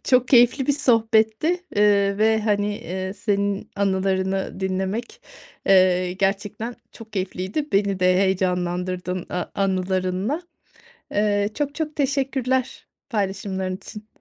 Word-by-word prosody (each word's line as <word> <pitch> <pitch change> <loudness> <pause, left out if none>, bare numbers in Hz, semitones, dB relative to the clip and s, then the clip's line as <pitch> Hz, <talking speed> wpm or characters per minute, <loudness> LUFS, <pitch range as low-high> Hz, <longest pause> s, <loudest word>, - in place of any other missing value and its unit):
çok 255 -1 +3
keyifli 245 +2 +5
bir 285 - +4
sohbetti, 230 +6 +2
eee, 200 -1 +3
ve 220 0 +3
hani, 205 -1 0
eee, 185 +2 -4
senin 200 -1 -1
anılarını 190 -1 0
dinlemek, 190 - -3 0.5
eee, 185 -1 +4
gerçekten 205 +4 -2 0.2
çok 225 -2 -13
keyifliydi. 190 +8 -3
Beni 195 -1 +1
de 185 0 +4
heyecanlandırdın 180 -1 -1
a 180 0 -2
anılarınla. 190 - -1 0.7
Eee, 205 0 +2
çok, 290 -1 -2
çok 305 -1 -4
teşekkürler 265 -2 -1 0.2
paylaşımların 190 -3 -2
için. 210 +2 -11
200 Hz, 110 wpm, -23 LUFS, 190-230 Hz, 0.7 s, keyifli